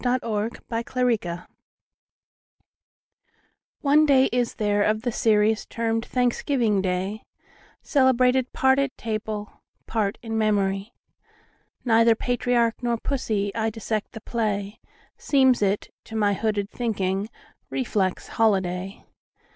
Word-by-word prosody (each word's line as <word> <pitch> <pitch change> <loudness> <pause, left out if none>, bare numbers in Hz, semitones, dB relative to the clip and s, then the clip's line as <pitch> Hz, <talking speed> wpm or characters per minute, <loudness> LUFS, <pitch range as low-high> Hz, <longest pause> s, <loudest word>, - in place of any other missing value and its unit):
Part 250 0 +1
One: 215 -1 -1 0.2
Life 230 0 -2
CXXXVII 225 -9 -1 2.4
ONE 295 +2 +5
day 265 -2 +5
is 245 -1 0
there 205 -2 +1
of 215 +1 +1
the 245 - 0
seriesTermed 225 +1 +1
Thanksgiving 245 -4 +1
day, 190 +3 -2 0.6
Celebrated 260 -2 +3
part 265 +1 +3
at 275 -1 -1
table, 215 -1 -5 0.2
Part 210 -3 -1
in 225 -1 -2
memory. 200 -1 0 0.9
Neither 230 -1 +5
patriarch 245 -1 0
nor 240 -1 0
pussy,I 220 -4 -1
dissect 220 -1 -4
the 225 - -8
play; 210 -3 -2 0.4
Seems 265 -4 +3
it, 200 0 0
to 225 - -9
my 205 -2 +2
hooded 205 0 -1
thinking, 200 -3 -2 0.4
Reflex 205 -8 -1
holiday. 190 -3 0
225 Hz, 105 wpm, -24 LUFS, 205-245 Hz, 2.4 s, ONE